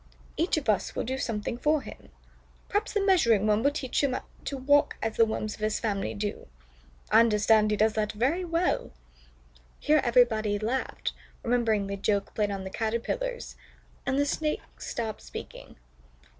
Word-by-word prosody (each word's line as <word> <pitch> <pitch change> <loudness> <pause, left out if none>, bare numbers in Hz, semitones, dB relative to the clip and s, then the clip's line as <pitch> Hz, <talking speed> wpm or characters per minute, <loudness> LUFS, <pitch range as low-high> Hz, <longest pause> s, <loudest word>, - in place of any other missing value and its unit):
Each 335 +1 +1
of 300 - -3
us 210 -3 +1
will - - -1
do 260 +3 -3
something 230 -1 -3
for 300 0 +2
him. - - -11 0.6
Perhaps 410 - -1
the 410 -2 +1
Measuring 235 - +4
Worm 210 0 +3
will 280 - +4
teach 285 -2 -2
him 260 -2 +1 0.3
to 275 - -3
walk 285 +2 +3
as 225 -1 -2
the 230 - +5
Worms 215 -1 -3
of - - -12
his 215 0 0
family 200 -4 -2
do. 205 0 -4 0.6
I - - +7
understand 215 -1 +4
he 210 - +1
does 220 +1 +3
that 215 -1 0
very 270 - 0
well." 340 - 0 0.9
Here 300 0 +3
everybody 230 -4 +3
laughed, 230 +6 -2 0.3
remembering 230 -4 +1
the 200 0 -4
joke 200 0 0
played 210 -1 0
on 195 -1 -4
the 190 - -6
Caterpillars, 240 - -3 0.5
and 265 - 0
the 285 - +3
Snake 305 +1 -1 0.2
stopped 220 -3 -4
speaking. - - -9
230 Hz, 170 wpm, -28 LUFS, 210-285 Hz, 0.9 s, I